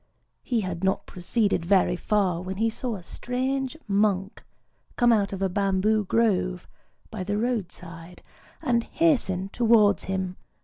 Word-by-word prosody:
He 240 -4 -1
had 185 -2 -5
not 190 0 +1
proceeded 190 +1 0
very 180 0 +3
far 185 -2 0
when 190 +1 -5
he 225 +2 +1
saw 235 0 -4
a 185 - -9
strange 260 - -3
monk 200 -1 0 0.5
come 240 -1 +4
out 205 -3 +1
of 195 0 -3
a - - +3
bamboo 200 +3 +1
grove 185 -4 +1 0.4
by 215 -4 -4
the 205 +2 -2
road 225 -5 -1
side, 170 0 -11 0.4
and 240 -5 +2
hasten 230 - +1
towards 220 -5 +3
him. 190 -1 -3
200 Hz, 145 wpm, -26 LUFS, 185-230 Hz, 0.5 s, come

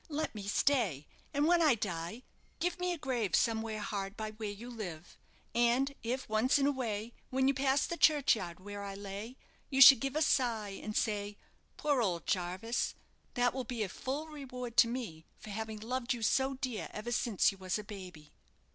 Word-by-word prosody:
Let 310 +1 -2
me 205 -3 -7
stay, 205 - +1 0.3
and 290 0 +1
when 345 +1 +4
I 300 -6 +5
die 190 +2 -4 0.4
give 350 +2 -1
me 360 0 0
a 350 - -2
grave 245 - 0
somewhere 220 -1 0
hard 200 0 -4
by 215 -1 -4
where 215 -1 -5
you 205 +4 -8
live; 180 -8 -7 0.4
and 240 +4 +2
if, 250 +3 -3
once 220 +6 +3
in 275 - +2
a 285 - +4
way, 230 -4 -3 0.2
when 265 +1 +2
you 275 - +4
pass 270 +1 +2
the 340 - -4
churchyard 225 - +3
where 205 +1 -7
I 200 -1 -5
lay, 205 +5 -7 0.3
you 270 - 0
should 270 -2 +11
give 275 +2 -3
a 310 - +3
sigh, 235 -7 +1
and 215 0 -3
say, 205 -2 -1 0.4
'Poor 285 -4 +1
old 175 -6 -1
Jarvis!' 185 +6 -1 0.4
that 245 -1 +2
will 260 0 -3
be 235 -2 -3
a 195 - -3
full 275 - -4
reward 255 -6 -7
to 230 - +8
me 225 -10 -5
for 215 - -10
having 220 +1 -4
loved 250 +2 -2
you 230 - -6
so 265 +5 +2
dear 255 -4 -4
ever 215 +3 -5
since 230 -4 +2
you 195 - -14
was 185 0 -1
a 210 - -6
baby." 185 -7 -10
230 Hz, 195 wpm, -33 LUFS, 205-265 Hz, 0.4 s, should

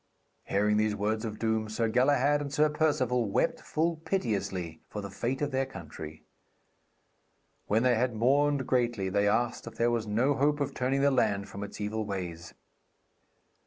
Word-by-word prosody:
Hearing 105 +1 +2
these 105 -1 +1
words 110 +2 -1
of 110 -1 -5
doom, 110 -1 0
Sir 115 +1 0
Galahad 140 +4 +3
and 140 -1 -5
Sir 150 +1 +3
Perceval 130 -7 +1
wept - - +1
full 165 +1 -1
piteously 100 - -2
for 105 - -5
the 100 -1 -6
fate 125 +8 -2
of 145 - -1
their 135 0 0
country. 80 - -9 1.4
When 110 +3 +2
they 125 -1 +4
had 120 0 0
mourned 140 +4 +2
greatly, 120 -7 0
they 100 +2 +2
asked 120 +3 0
if - - -8
there 120 +1 +2
was 115 -2 -1
no 120 +7 +2
hope 145 +2 +1
of 140 - -1
turning 135 +2 0
the 140 0 +4
land 105 -6 +1
from 100 - -6
its 100 - -8
evil 105 +1 -2
ways. 90 -5 -6
115 Hz, 170 wpm, -29 LUFS, 105-135 Hz, 1.4 s, they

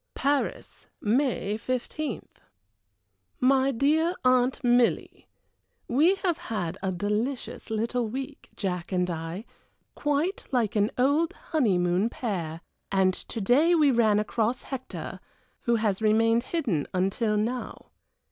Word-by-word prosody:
"PARIS, 285 0 -2
May 220 -3 0
15th. 255 +3 -4 1.0
"MY 265 +1 +4
DEAR 310 +7 +2
AUNT 255 +1 +3
MILLY, 245 -1 +2 0.6
We 310 +10 +4
have 355 -4 -1
had 195 - -4
a 190 - -1
delicious 210 +11 -3
little 230 +2 -1
week, 270 +5 -6
Jack 180 -2 -3
and 180 -1 +1
I, 165 +5 -5 0.5
quite 295 +6 -1
like 235 -5 +1
an 205 0 +3
old 285 +6 +2 0.2
honeymoon 190 - +2
pair 170 -10 -4 0.3
and 190 -1 +3
to 225 - -7
day 290 - +4
we 300 -4 +5
ran 220 -4 +3
across 220 +3 0
Hector, 195 - -6 0.5
who 235 - +3
has 215 -3 0
remained 225 +2 +3
hidden 235 - -1
until 205 +4 +1
now. 235 +4 -3
235 Hz, 120 wpm, -27 LUFS, 200-270 Hz, 1.0 s, we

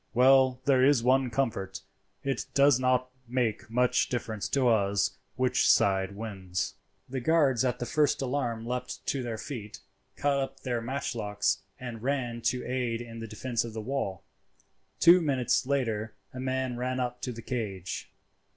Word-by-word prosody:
Well, 130 0 +5
there 130 -2 +4
is 135 -3 +4
one 130 +1 +3
comfort—it 100 0 -4
does 140 -2 +5
not 130 0 +1 0.2
make 120 -4 -1
much 125 +2 +2
difference 110 -5 -3
to 135 -3 +2
us 100 -3 +2 0.2
which 125 0 +2
side 95 0 +3
wins." 95 -4 -4 0.3
The 130 +1 -3
guards 135 -3 +3
at 125 -1 0
the 120 - -3
first 150 +2 +2
alarm 125 -4 -2
leapt 125 +1 -4
to 135 - -1
their 120 -2 -4
feet, 110 -4 -7 0.4
caught 140 -1 +1
up 135 0 -4
their 120 -3 -2
matchlocks, 110 -6 -1 0.2
and 120 -3 -6
ran 125 -3 -1
to 125 -1 -3
aid 125 -2 -1
in 115 -1 -8
the 115 - -6
defence 115 +2 -2
of 115 -2 -7
the 110 - -4
wall. 105 -6 -3 0.8
Two 175 +2 +8
minutes 130 -4 +1
later 115 -6 -1 0.2
a 130 - -7
man 130 -1 -1
ran 130 +1 -2
up 125 -1 -3
to 125 - -3
the 115 -1 -8
cage. 100 -7 -4
125 Hz, 160 wpm, -29 LUFS, 110-130 Hz, 0.8 s, Two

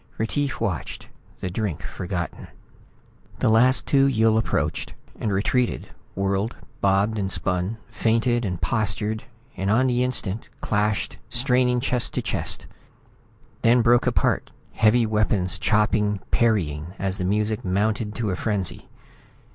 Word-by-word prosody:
Retief 120 +2 -1
watched, 90 -7 -3 0.3
the 90 - -3
drink 95 -4 -3
forgotten. 90 -2 -5 0.9
The - - +2
last 125 +4 +4
two 135 -1 +4
Yill 110 -4 +3
approached 110 - -1 0.2
and 105 - -1
retreated, 115 +5 0 0.3
whirled, 100 +3 -1 0.3
bobbed 100 +3 +2
and 95 -1 -1
spun, 90 +4 -1
feinted 115 +2 +1
and 90 -5 -2
postured 110 0 -1 0.3
and 95 +1 -2
on 120 +5 +4
the 125 -1 +2
instant, 115 -5 -2
clashed, 105 -1 -1
straining 125 -1 +2
chest 125 -2 0
to - - 0
chest - - -2 1.0
then 120 +1 +4
broke 120 +1 +4
apart, - - +1 0.2
heavy 110 +2 +3
weapons 105 -4 +1
chopping, 105 -1 +2
parrying, 90 -7 +1
as 95 0 -2
the - - -1
music 105 +4 0
mounted 105 +3 0
to 110 -4 -1
a - - -1
frenzy. 100 -3 -2
110 Hz, 130 wpm, -24 LUFS, 95-115 Hz, 1.0 s, last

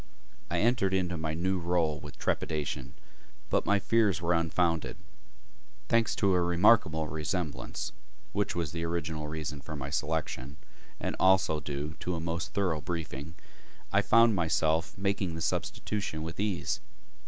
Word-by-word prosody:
I - - +1
entered 110 -4 +3
into 90 -2 0
my 80 -1 -2
new 95 +3 0
role 85 -3 +1
with 75 - -10
trepidation, 70 -4 -2 0.6
but - - +2
my 100 - +5
fears 105 -3 +3
were 85 0 +1
unfounded. 85 0 +1 0.9
Thanks 115 -1 +3
to 100 -2 +3
a 90 - +3
remarkable 85 -2 +4
resemblance 80 +1 -3 0.4
(which - - 0
was 85 -4 -1
the 85 0 -3
original 80 -2 -2
reason 75 -2 -4
for 75 +3 -7
my 70 -1 -5
selection) 75 -3 -2 0.4
and - - -2
also 95 -4 +4
due 75 +1 -4
to 90 - -2
a - - -3
most 85 +1 -3
thorough 90 -6 +1
briefing, 80 -2 -5 0.6
I 100 - +5
found 115 +2 +6
myself 80 -1 +1
making 100 -3 0
the 80 - -5
substitution 90 -3 -2
with 80 +2 -6
ease. 100 -3 0
85 Hz, 145 wpm, -30 LUFS, 80-95 Hz, 0.9 s, found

